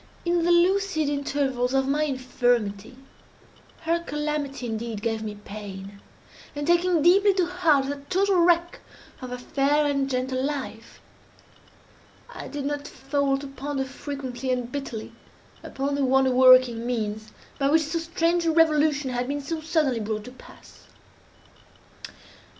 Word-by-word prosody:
In 345 Hz, 0 st, +1 dB
the 345 Hz, -, +3 dB
lucid 345 Hz, -3 st, +2 dB
intervals 275 Hz, -3 st, -1 dB
of 270 Hz, 0 st, +2 dB
my 295 Hz, +2 st, +1 dB
infirmity, 245 Hz, -5 st, -1 dB, 0.8 s
her 335 Hz, +1 st, 0 dB
calamity, 295 Hz, -4 st, -3 dB
indeed, 225 Hz, -2 st, -4 dB
gave 225 Hz, -1 st, -1 dB
me 215 Hz, -1 st, -5 dB
pain, 200 Hz, -1 st, -9 dB, 0.5 s
and, 290 Hz, 0 st, -3 dB
taking 345 Hz, -1 st, +3 dB
deeply 390 Hz, +3 st, +5 dB
to 370 Hz, -2 st, +2 dB
heart 335 Hz, -6 st, +2 dB
that 280 Hz, 0 st, -6 dB
total 390 Hz, 0 st, +2 dB
wreck 345 Hz, 0 st, +2 dB, 0.4 s
of 255 Hz, -, -6 dB
her 250 Hz, -, -5 dB
fair 280 Hz, +4 st, +1 dB
and 275 Hz, -1 st, 0 dB
gentle 255 Hz, 0 st, -1 dB
life, 270 Hz, -5 st, -5 dB, 1.3 s
I -, -, -8 dB
did 285 Hz, -1 st, -5 dB
not 290 Hz, 0 st, -3 dB
fail 275 Hz, +1 st, -1 dB
to 280 Hz, -, -8 dB
ponder, 275 Hz, 0 st, -4 dB
frequently 265 Hz, -2 st, -6 dB
and 250 Hz, -1 st, -1 dB
bitterly, 260 Hz, -6 st, -5 dB, 0.5 s
upon 275 Hz, +1 st, -3 dB
the 280 Hz, 0 st, 0 dB
wonder 265 Hz, 0 st, +3 dB
working 255 Hz, -2 st, +6 dB
means 215 Hz, -3 st, -3 dB, 0.3 s
by 275 Hz, 0 st, +2 dB
which 315 Hz, +2 st, +4 dB
so 320 Hz, +3 st, -2 dB
strange 335 Hz, +1 st, 0 dB
a -, -, +4 dB
revolution 305 Hz, -4 st, +3 dB
had 245 Hz, 0 st, -2 dB
been 285 Hz, +1 st, -2 dB
so 315 Hz, +3 st, -4 dB
suddenly 305 Hz, -6 st, 0 dB
brought 215 Hz, 0 st, -3 dB
to 250 Hz, -, -10 dB
pass. 255 Hz, -, -17 dB
275 Hz, 145 wpm, -25 LUFS, 250-310 Hz, 1.3 s, working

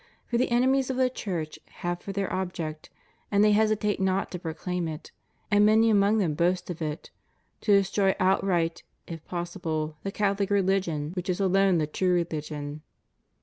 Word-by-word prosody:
For 235 Hz, -, -1 dB
the 255 Hz, -, +1 dB
enemies 260 Hz, +2 st, +2 dB
of 260 Hz, -, -2 dB
the 255 Hz, -1 st, +2 dB
Church 170 Hz, -10 st, -4 dB, 0.3 s
have 175 Hz, 0 st, -1 dB
for 200 Hz, -, -6 dB
their 195 Hz, -1 st, -2 dB
object 175 Hz, -4 st, -4 dB, 0.2 s
— -, -, -38 dB
and 200 Hz, 0 st, +4 dB
they 210 Hz, -, +5 dB
hesitate 210 Hz, -1 st, +2 dB
not 190 Hz, 0 st, 0 dB
to 180 Hz, -, -5 dB
proclaim 170 Hz, +1 st, -3 dB
it, 155 Hz, +1 st, -7 dB, 0.4 s
and 205 Hz, 0 st, +5 dB
many 220 Hz, +2 st, +5 dB
among 205 Hz, +1 st, +4 dB
them 180 Hz, -8 st, +1 dB
boast 180 Hz, +3 st, 0 dB
of 170 Hz, -, -8 dB
it 155 Hz, +1 st, -4 dB, 0.3 s
— -, -, -44 dB
to 210 Hz, -, +1 dB
destroy 195 Hz, 0 st, +2 dB
outright, 185 Hz, -3 st, +1 dB, 0.2 s
if 165 Hz, -2 st, -8 dB
possible, 165 Hz, -3 st, -3 dB
the 195 Hz, -, -4 dB
CathoHc 200 Hz, -1 st, 0 dB
religion, 190 Hz, -6 st, +1 dB
which 180 Hz, 0 st, -5 dB
is 180 Hz, -, 0 dB
alone 195 Hz, -1 st, +3 dB
the 155 Hz, -, +1 dB
true 180 Hz, +4 st, 0 dB
religion. 150 Hz, -3 st, -3 dB
185 Hz, 180 wpm, -27 LUFS, 165-200 Hz, 0.4 s, they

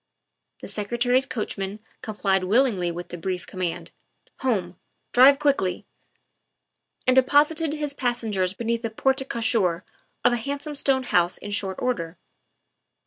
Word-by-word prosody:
' -, -, -56 dB
' -, -, -56 dB
The -, -, -7 dB
Secretary's 240 Hz, +5 st, +1 dB
coachman 205 Hz, -3 st, -4 dB, 0.2 s
complied 195 Hz, -3 st, 0 dB
willingly 205 Hz, -4 st, +2 dB
with 175 Hz, +1 st, -6 dB
the 175 Hz, -, -7 dB
brief 180 Hz, +1 st, -3 dB
command, 185 Hz, -3 st, -4 dB, 0.2 s
" -, -, -38 dB
Home; 185 Hz, -9 st, -1 dB, 0.3 s
drive 265 Hz, +3 st, +7 dB
quickly!" 275 Hz, -11 st, 0 dB, 1.2 s
and 255 Hz, -, +4 dB
de 260 Hz, -, +8 dB
posited 300 Hz, +3 st, +2 dB
his 295 Hz, -2 st, -2 dB
passengers 225 Hz, -8 st, -1 dB
beneath 235 Hz, +1 st, -1 dB
the 230 Hz, -, -2 dB
porte 265 Hz, +4 st, 0 dB
cochere 210 Hz, -7 st, +1 dB, 0.4 s
of -, -, +5 dB
a -, -, +1 dB
handsome 280 Hz, +4 st, -4 dB
stone 270 Hz, -2 st, +1 dB
house 175 Hz, -7 st, +2 dB
in 205 Hz, -, -8 dB
short 195 Hz, -2 st, -2 dB
order. 170 Hz, -9 st, -2 dB
230 Hz, 145 wpm, -24 LUFS, 190-265 Hz, 1.2 s, de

